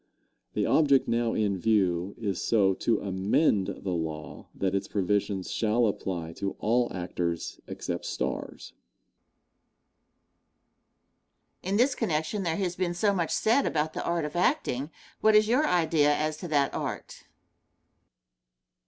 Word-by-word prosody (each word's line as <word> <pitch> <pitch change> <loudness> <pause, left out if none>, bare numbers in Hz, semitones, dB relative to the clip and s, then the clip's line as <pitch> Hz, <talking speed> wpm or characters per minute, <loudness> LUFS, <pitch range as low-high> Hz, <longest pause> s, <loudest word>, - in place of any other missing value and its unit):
The - - +1
object 140 -4 +4
now 115 0 +1
in 100 -3 0
view 95 -3 +1
is 100 -5 -3
so 100 -4 +3
to 110 +3 0
amend 100 +2 +1
the 100 -1 -4
law 80 -3 -5
that 95 -1 -1
its 100 0 -1
provision 100 -1 0
shall 115 +5 +1
apply 90 -5 -3
to 100 0 -2
all 120 +2 +1
actors 90 -2 -3
except - - -5
stars. - - -4 2.9
Question. 190 - -3
In - - +3
this 255 +4 +4
connection 195 -3 -1
there 165 -3 -1
has 180 -3 -1
been 175 -1 -1
so 200 +3 +2
much 170 -4 -1
said 235 +6 +2
about 155 0 -1
the - - -4
art 170 -2 -1
of 150 - -6
acting 175 - 0 0.3
what 220 0 +4
is 215 0 +5
your 255 +7 +3
idea 160 -4 +3
as 155 +1 -1
to 175 - -6
that 145 -3 +1
art? - - -5
120 Hz, 140 wpm, -28 LUFS, -, 2.9 s, is